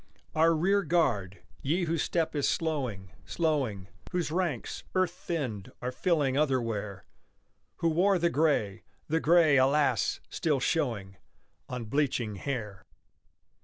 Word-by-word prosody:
Our 165 +1 +4
rear 195 +5 +2
guard, 125 - 0 0.2
ye 165 +7 0
whose 165 -2 0
step 165 -2 0
is 145 - +1
slowing, 125 - -2
slowing, 135 - -1 0.2
Whose 175 -5 -1
ranks, 175 -2 -2
earth 185 -2 +2
thinned, 135 - -4
are 125 +1 -3
filling 145 -3 +1
otherwhere, 115 - -1 0.7
Who 165 - +1
wore 185 +4 +3
the 170 0 +1
gray 140 -11 +1 0.3
the 160 +2 +1
gray, 160 -3 +5
alas! 140 +3 +2
still 150 -4 0
showing 115 - -1 0.5
On 125 -2 -4
bleaching 120 -5 -1
hair. 105 -6 -4
145 Hz, 125 wpm, -29 LUFS, 115-165 Hz, 0.7 s, gray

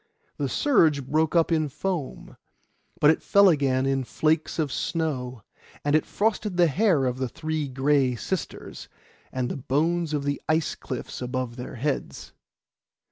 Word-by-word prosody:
The 140 -2 -1
surge 155 - +3
broke 155 +4 +1
up 165 0 +3
in 155 -2 +1
foam, 170 -1 -4 0.6
but 150 - +6
it 160 - -1
fell 200 -1 +5
again 135 -5 +2
in 135 -1 +1
flakes 155 +5 0
of 155 -4 0
snow; 130 - -2 0.4
and 145 +1 +3
it 155 - +2
frosted 210 -3 -1
the 175 - +6
hair 170 -3 +2
of 125 0 -2
the 130 -2 -1
three 155 0 -3
Gray 135 -1 +2
Sisters, 180 - -5 0.4
and 130 -1 -2
the - - -4
bones 160 +5 0
in 145 - -1
the 140 0 -2
ice 155 -1 +1
cliff 130 0 -6
above 125 -1 -3
their 125 0 -7
heads. 140 +4 -3
145 Hz, 155 wpm, -25 LUFS, 130-160 Hz, 0.6 s, but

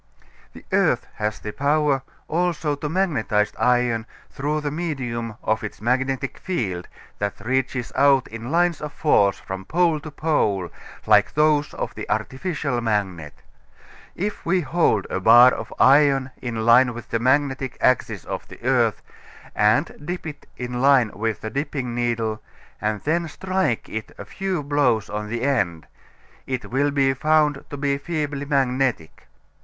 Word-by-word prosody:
The - - -13
earth - - +2
has 105 0 -2
the 105 - -6
power 145 +1 +1 0.3
also 165 -2 0
to 145 +1 -4
magnetize 125 - 0
iron 120 -2 +2 0.2
through 150 +2 -2
the 145 -1 -2
medium 125 -9 -3
of 110 0 0
its 105 - -6
magnetic 130 +4 -1
field, 95 - -3 0.3
that 100 -1 -3
reaches 125 +1 -1
out 135 -1 +4
in 115 +2 -7
lines 170 +1 +1
of 150 -1 -5
force 100 -10 +3
from 95 0 -7
pole 165 - +1
to 155 - -8
pole 105 - 0 0.3
like 105 -1 +4
those 150 -1 +2
of - - -4
the - - -7
artificial 140 -3 -2
magnet. 95 -9 -2 0.7
If 205 +3 -3
we 180 +2 +1
hold 145 - +1
a - - -1
bar 120 +5 +8
of - - -6
iron 135 -1 +4
in 115 -3 -3
line 120 +1 +5
with 120 - -9
the 115 - +1
magnetic 130 +1 +1
axis 125 - +1
of - - -5
the - - -12
earth - - +2 0.5
and 105 +2 +2
dip 175 +2 -5
it 150 -2 -8
in 125 0 -4
line 135 -5 +4
with 110 +2 -2
the 110 - -5
dipping 140 -2 -3
needle 115 -2 -1 0.4
and 105 -1 -1
then 170 +3 0
strike 185 -6 -1
it 110 0 -6
a - - -8
few 190 -5 -3
blows 140 -7 +1
on 105 0 -3
the 115 +3 -3
end, 90 - 0 0.6
it 130 -2 -4
will 140 +3 +2
be 135 -1 +2
found 150 0 +2
to 145 - -6
be 140 0 0
feebly 145 -3 -3
magnetic. 130 - -1
130 Hz, 155 wpm, -23 LUFS, 115-150 Hz, 0.7 s, bar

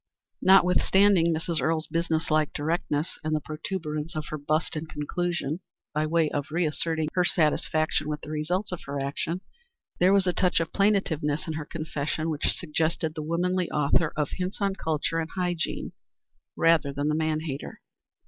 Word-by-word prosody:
Notwithstanding 190 -1 +5
Mrs. 165 0 -1
Earle's 160 0 +1
business 165 0 -1
like 155 -1 +3
directness 150 0 -1
and 155 0 0
the - - +1
protuberance 155 0 -4
of 155 -1 -3
her 155 - -3
bust 155 +3 0
in 155 +1 -4
conclusion, 160 0 -2 0.3
by 155 0 +1
way 165 0 +3
of 145 -1 -2
reasserting 160 -1 0
her 180 - +3
satisfaction 155 -2 +1
with 150 0 -3
the 150 - -8
results 175 +7 -1
of 180 - -4
her 140 0 -3
action, 145 +6 -2 0.6
there 180 +2 +5
was 195 -1 +4
a 180 - +2
touch 180 -1 +2
of 165 -1 -3
plaintiveness 165 -8 +1
in 160 - -3
her 155 -1 -4
confession 155 0 -3
which 150 - -1
suggested 160 -1 -1
the 155 - -5
womanly 175 +3 0
author 150 +2 +2
of 150 -2 0
"Hints 185 +1 -3
on 200 -1 +1
Culture 160 -2 -1
and 160 0 -3
Hygiene," 175 -3 -1 0.7
rather 165 -4 +4
than 145 +1 -2
the 150 - +2
man 155 0 0
hater. 145 -3 -6
160 Hz, 165 wpm, -27 LUFS, 150-175 Hz, 0.7 s, Notwithstanding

